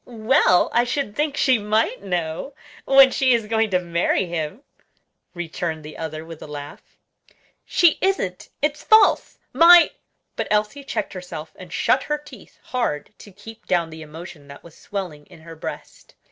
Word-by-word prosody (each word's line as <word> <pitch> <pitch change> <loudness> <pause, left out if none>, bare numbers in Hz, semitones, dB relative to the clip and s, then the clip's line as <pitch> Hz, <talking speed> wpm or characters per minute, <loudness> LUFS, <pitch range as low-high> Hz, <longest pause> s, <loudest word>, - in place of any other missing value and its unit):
"Well, 230 -4 +2
I 240 - +4
should 245 -3 -3
think 295 -1 -1
she 255 -3 +3
might 215 +3 0
know, 180 - -3 0.3
when 270 -1 +7
she 260 -2 +3
is 230 -2 -2
going 220 0 +1
to 185 - +2
marry 175 +2 0
him," 170 - -5 0.7
returned 165 -2 -4
the 155 - -9
other, 155 0 -6
with 165 -1 -11
a - - -8
laugh. 145 -1 -10 0.7
"She 345 -3 +3
isn't! 375 - -1
it's 300 0 0
false! 435 0 +4 0.2
my" 345 +1 +7 0.4
but - - -3
Elsie 215 +7 0
checked 295 +2 -4
herself 180 -4 -8
and 180 -2 -12
shut 260 - +2
her 300 +2 -2
teeth 295 0 -15
hard 225 -9 -3
to 205 - -13
keep 215 +4 -13
down 170 -2 0
the 160 0 -10
emotion 155 -1 -11
that 140 0 -12
was 170 -2 -15
swelling 175 -8 -7
in 175 -3 -16
her 165 0 -11
breast. 160 - -9
195 Hz, 165 wpm, -22 LUFS, 165-260 Hz, 0.7 s, when